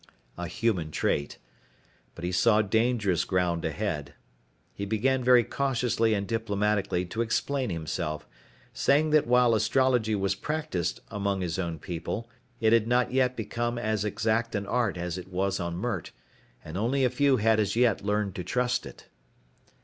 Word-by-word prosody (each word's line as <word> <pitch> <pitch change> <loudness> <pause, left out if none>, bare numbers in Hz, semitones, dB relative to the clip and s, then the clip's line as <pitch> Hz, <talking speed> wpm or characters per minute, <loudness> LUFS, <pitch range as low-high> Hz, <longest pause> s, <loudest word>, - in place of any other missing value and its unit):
A 90 0 -5
human 105 -7 -1
trait. 70 -1 -1 0.8
But 85 - -10
he 90 - -1
saw 105 +4 +4
dangerous 110 -4 +1
ground 90 -3 0
ahead. 75 -9 -3 0.6
He 100 - -6
began 125 +6 +1
very 125 -1 +6
cautiously 120 -4 0
and 100 -1 -2
diplomatically 105 -4 0
to 110 +6 -3
explain 130 +3 -1
himself, 80 -2 -3 0.5
saying 150 +2 +2
that 155 -4 +4
while 125 -1 +4
astrology 110 0 +2
was 100 -1 0
practiced 150 - -3
among 100 -1 -1
his 85 0 -2
own 85 -3 -2
people, 90 +7 -5 0.3
it 110 0 +3
had 115 -1 +4
not 125 +1 +2
yet 130 -1 +1
become 120 +2 -2
as 110 -3 -1
exact 110 +2 0
an 100 -1 -2
art 115 -4 0
as 90 +1 -3
it 90 - -10
was 95 +1 -1
on 85 -1 -3
Mert, 95 -4 -3 0.6
and 80 +3 -6
only 130 +5 +1
a - - +3
few 135 +1 +3
had 110 0 +3
as 100 -1 0
yet 120 -5 +2
learned 105 -1 0
to 90 - -3
trust 125 +4 0
it. - - -13
110 Hz, 160 wpm, -28 LUFS, 95-120 Hz, 0.8 s, very